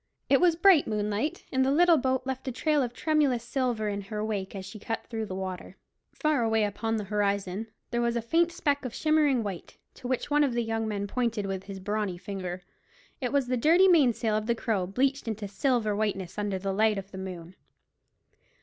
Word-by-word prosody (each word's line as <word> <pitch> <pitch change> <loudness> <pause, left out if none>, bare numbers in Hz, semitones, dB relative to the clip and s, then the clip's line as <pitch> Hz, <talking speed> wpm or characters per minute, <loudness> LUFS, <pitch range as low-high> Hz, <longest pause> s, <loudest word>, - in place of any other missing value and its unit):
It 275 - +5
was 350 -2 +5
bright 345 -3 +5
moonlight, 210 +6 -2
and 260 0 +2
the 265 - +2
little 340 +2 +5
boat 260 0 0
left 265 0 -4
a - - 0
trail 300 +4 +1
of 245 -3 -1
tremulous 285 -4 +1
silver 240 -3 -1
in 200 -1 -2
her 210 +2 -4
wake 200 -3 -3
as 190 -1 -6
she 200 +3 -9
cut 225 +2 -4
through 225 -2 -4
the 185 - -5
water. 185 -1 -6 0.3
Far 305 -4 +1
away 225 -1 +2
upon 225 +2 -1
the 210 - -3
horizon 200 0 -1 0.2
there 240 -1 0
was 235 0 +1
a 235 - 0
faint 335 +8 +2
speck 285 -4 0
of 250 -3 -5
shimmering 300 -6 +2
white, 195 -4 -7 0.2
to 250 - -8
which 255 +3 -2
one 295 0 +4
of 270 -4 +1
the 240 - +1
young 225 0 -2
men 200 -2 -2
pointed 230 -1 -1
with 195 -1 -4
his 195 -1 -7
brawny 205 -1 -2
finger 185 -1 -6 0.6
It 250 -3 -2
was 280 -2 +2
the 250 0 -1
dirty 335 +9 +5
mainsail 250 - +3
of 215 0 -1
the 235 - +2
Crow 210 -6 -1
bleached 265 +6 0
into 215 -2 -3
silver 215 0 0
whiteness 200 -3 -2
under 205 -2 -1
the 195 +1 -2
light 215 +1 +2
of 195 0 -7
the 190 - -7
moon. 180 -2 -7
225 Hz, 215 wpm, -28 LUFS, 200-265 Hz, 0.6 s, It